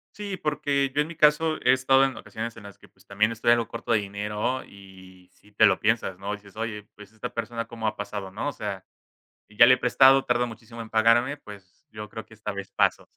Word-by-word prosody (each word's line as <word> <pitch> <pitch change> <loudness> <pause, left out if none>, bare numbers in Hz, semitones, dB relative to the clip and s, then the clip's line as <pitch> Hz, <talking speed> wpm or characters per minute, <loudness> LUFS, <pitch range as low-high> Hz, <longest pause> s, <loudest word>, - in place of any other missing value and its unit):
Sí, 200 -2 -5
porque 140 -3 -1
yo 145 - +2
en 150 - -2
mi 170 - -9
caso 155 +1 +3
he 125 +1 +5
estado 135 +1 +4
en 135 - -3
ocasiones 115 +1 -7
en 110 - -12
las 100 - -12
que, - - -19
pues, - - -27
también 105 +3 +1
estoy 115 +1 -1
algo 120 -1 +4
corto 115 0 -3
de - - +5
dinero 105 +5 -3
y 95 -2 -16
si 105 - -24
te 110 - +5
lo 95 -2 +3
piensas, 105 -5 0
¿no? 100 +1 -4
Dices, 100 -1 -11
oye, 110 -2 -5
pues, 105 0 -14
esta 110 +3 -7
persona 115 0 -4
cómo 115 -1 -5
ha - - -1
pasado, 100 -1 -5
¿no? 105 +9 -4
O - - -4
sea, 100 -5 -6 0.6
y 105 - -20
ya 120 - +9
le 130 +1 +7
he - - -10
prestado, 135 +2 +5
tarda 125 0 +1
muchísimo 115 0 -10
en 110 - -9
pagarme, 115 +5 +3
pues 105 +4 -15
yo 105 -1 -9
creo 110 - -8
que 110 - -18
esta 105 -1 -5
vez 100 0 -7
paso. - - +1
110 Hz, 240 wpm, -25 LUFS, 105-130 Hz, 0.6 s, ya